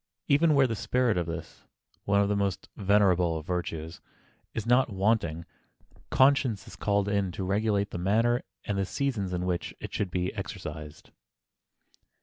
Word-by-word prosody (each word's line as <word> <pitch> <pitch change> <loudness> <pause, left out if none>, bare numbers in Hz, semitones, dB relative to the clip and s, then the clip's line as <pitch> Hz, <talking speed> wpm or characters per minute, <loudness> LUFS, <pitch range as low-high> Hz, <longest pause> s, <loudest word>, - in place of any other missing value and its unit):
Even 150 +2 +4
where 140 -1 +5
the 115 -3 -1
spirit 125 +2 +1
of 90 -2 -1
this—one 85 +4 -4
of 100 - +2
the 105 - +1
most 100 -4 -2
venerable 95 -4 +3
of 80 - -7
virtues—is 85 +4 -6
not 125 +2 +4
wanting, 95 -5 0 0.6
conscience 130 -6 +3
is - - -10
called 100 -1 +1
in 100 -2 0
to 95 - -4
regulate 100 +1 0
the - - -4
manner 115 +6 +2 0.2
and 100 -1 -1
the 95 - +1
seasons 115 -9 -1
in 90 0 -2
which 90 -1 -2
it - - -7
should 100 - -1
be 90 0 -2
exercised. 75 0 -7
100 Hz, 150 wpm, -28 LUFS, 90-110 Hz, 0.6 s, where